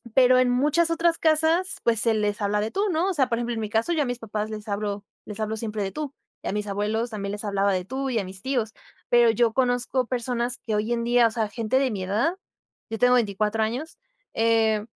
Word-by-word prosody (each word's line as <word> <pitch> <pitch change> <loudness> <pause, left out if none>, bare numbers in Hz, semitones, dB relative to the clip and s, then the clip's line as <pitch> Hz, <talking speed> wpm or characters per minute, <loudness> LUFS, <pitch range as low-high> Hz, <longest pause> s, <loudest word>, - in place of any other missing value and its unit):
pero 255 -1 +6
en 255 -1 +3
muchas 300 +7 +2
otras 330 0 +1
casas, 320 +4 +2
pues 230 -2 +3
se 230 -1 +5
les 210 0 -1
habla 210 +1 +1
de 215 +2 -2
tú, 395 - -1
¿no? 345 +4 +1
O - - 0
sea, 270 -6 +1
por 230 - 0
ejemplo, 240 0 -2
en 225 - -3
mi 215 - -3
caso, 225 +11 0
yo 315 - +1
a 285 - +1
mis 245 -1 -3
papás 215 -1 -4
les 215 0 -7
hablo 205 0 -3 0.2
les 210 0 -8
hablo 215 0 -2
siempre 215 -2 -3
de 195 - -3
tú, 300 +1 -5 0.3
y - - -6
a - - -1
mis 210 0 -2
abuelos 210 +4 -2
también 200 -1 -4
les 210 - -6
hablaba 200 0 +1
de 185 -1 -1
tú, 265 +5 -3
y 235 - -1
a - - -2
mis 190 0 -9
tíos. 240 -4 -1 0.4
Pero 240 -1 +5
yo 225 0 +2
conozco 250 0 0
personas 245 0 -2
que 225 -3 -5
hoy 215 +2 -1
en 235 0 -1
día, 240 0 +4
o - - -4
sea, 220 -2 -1
gente 230 +3 -1
de 270 -2 +1
mi 195 -3 -4
edad. 215 - 0 0.5
Yo 225 - -3
tengo 250 0 +5
24 215 -1 +1
años, 250 - -4 0.4
eh, 225 -2 +2
230 Hz, 250 wpm, -25 LUFS, 210-255 Hz, 0.5 s, pero